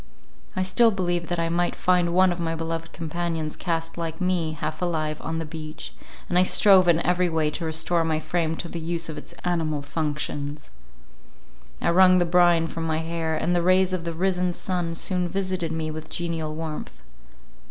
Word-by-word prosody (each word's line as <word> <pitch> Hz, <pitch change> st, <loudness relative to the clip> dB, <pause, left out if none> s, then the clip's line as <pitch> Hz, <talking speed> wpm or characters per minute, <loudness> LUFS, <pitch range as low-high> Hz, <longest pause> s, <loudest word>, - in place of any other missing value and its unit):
I 185 Hz, -, +1 dB
still 225 Hz, +6 st, +4 dB
believed 175 Hz, -4 st, -1 dB
that 175 Hz, -, -1 dB
I 165 Hz, 0 st, 0 dB
might 175 Hz, +1 st, 0 dB
find 180 Hz, -1 st, +2 dB
one 185 Hz, +1 st, +4 dB
of 175 Hz, -, -4 dB
my 165 Hz, -1 st, -1 dB
beloved 165 Hz, 0 st, -4 dB
companions 165 Hz, -1 st, -3 dB
cast 165 Hz, -1 st, -3 dB
like 165 Hz, -1 st, -4 dB
me, 180 Hz, -4 st, 0 dB
half 155 Hz, +1 st, -4 dB
alive, 155 Hz, -3 st, -1 dB
on 160 Hz, +1 st, -3 dB
the 165 Hz, -, -3 dB
beach; 155 Hz, 0 st, -8 dB, 0.3 s
and 175 Hz, -, +3 dB
I -, -, +6 dB
strove 190 Hz, -1 st, +6 dB
in 170 Hz, -2 st, +5 dB
every 180 Hz, 0 st, +2 dB
way 160 Hz, -2 st, +1 dB
to 170 Hz, -, -4 dB
restore 160 Hz, +1 st, +1 dB
my 160 Hz, -1 st, 0 dB
frame 165 Hz, 0 st, -1 dB
to 175 Hz, -, -5 dB
the 170 Hz, -, -5 dB
use 165 Hz, 0 st, -2 dB
of 155 Hz, -, -6 dB
its -, -, -10 dB
animal 160 Hz, -4 st, 0 dB
functions. 145 Hz, -1 st, -4 dB, 1.1 s
I -, -, +1 dB
wrung 185 Hz, +1 st, +6 dB
the 175 Hz, -, +3 dB
brine 175 Hz, -1 st, +4 dB
from 165 Hz, 0 st, -4 dB
my 160 Hz, -1 st, 0 dB
hair; 160 Hz, 0 st, -2 dB
and 170 Hz, +3 st, 0 dB
the 175 Hz, -, +2 dB
rays 185 Hz, +1 st, +3 dB
of 180 Hz, -2 st, -2 dB
the 170 Hz, 0 st, -3 dB
risen 180 Hz, 0 st, 0 dB
sun 175 Hz, -2 st, -2 dB
soon 180 Hz, +1 st, 0 dB
visited 185 Hz, -3 st, -2 dB
me 160 Hz, -1 st, -3 dB
with 155 Hz, 0 st, -7 dB
genial 165 Hz, -3 st, -3 dB
warmth. 160 Hz, -1 st, -6 dB
170 Hz, 195 wpm, -25 LUFS, 160-180 Hz, 1.1 s, I